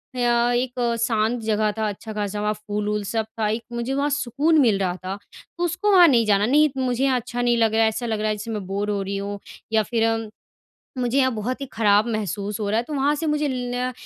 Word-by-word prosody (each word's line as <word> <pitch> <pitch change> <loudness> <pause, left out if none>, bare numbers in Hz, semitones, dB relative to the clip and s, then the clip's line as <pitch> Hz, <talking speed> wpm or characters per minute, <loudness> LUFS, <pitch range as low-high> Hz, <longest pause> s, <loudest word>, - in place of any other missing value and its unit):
अ, - - -7
एक 245 +1 +1 0.2
शांत 225 +1 +1
जगह 215 -1 +1
था, 220 -1 0
अच्छा-खासा 210 0 -4
वहाँ 210 0 0
फूल-वूल 210 0 -3
सब 220 +2 -2
था, 215 - +1
एक 225 +2 -2
मुझे 235 +3 -2
वहाँ 280 +1 0
सुकून 290 +3 +1
मिल 225 -6 +3
रहा 180 -2 0
था। 190 +1 -3 0.4
तो 345 - -2
उसको 350 +5 0
वहाँ 360 -3 +8
नहीं 240 -6 +4
जाना, 205 -1 +3
"नहीं, 300 +6 +4
मुझे 255 -1 0
यहाँ 260 -2 +2
अच्छा 240 +1 -5
नहीं 240 -1 +2
लग 225 -1 +2
रहा 225 0 +4
है, 220 - +4
ऐसा 230 +3 -4
लग 220 -2 -2
रहा 215 - 0
है 215 - 0
जैसे 215 +2 -6
मैं 210 -3 -4
बोर 200 +2 -2
हो 205 -1 -1
रही 195 +1 -3
हूँ, 200 +1 -4 0.3
या 220 -1 +4
फिर 225 +1 -1
अ, 225 0 +1 0.8
मुझे 250 +2 +1
यहाँ 260 -1 +3
बहुत 240 +5 -3
ही 275 - -4
ख़राब 210 0 +3
महसूस 205 0 -3
हो 205 - -1
रहा 215 - +2
है।" 235 - -1
तो 305 - -4
वहाँ 285 +1 +2
से 320 +2 -3
मुझे 300 -1 0
ल 250 0 -2
225 Hz, 245 wpm, -23 LUFS, 210-255 Hz, 0.8 s, वहाँ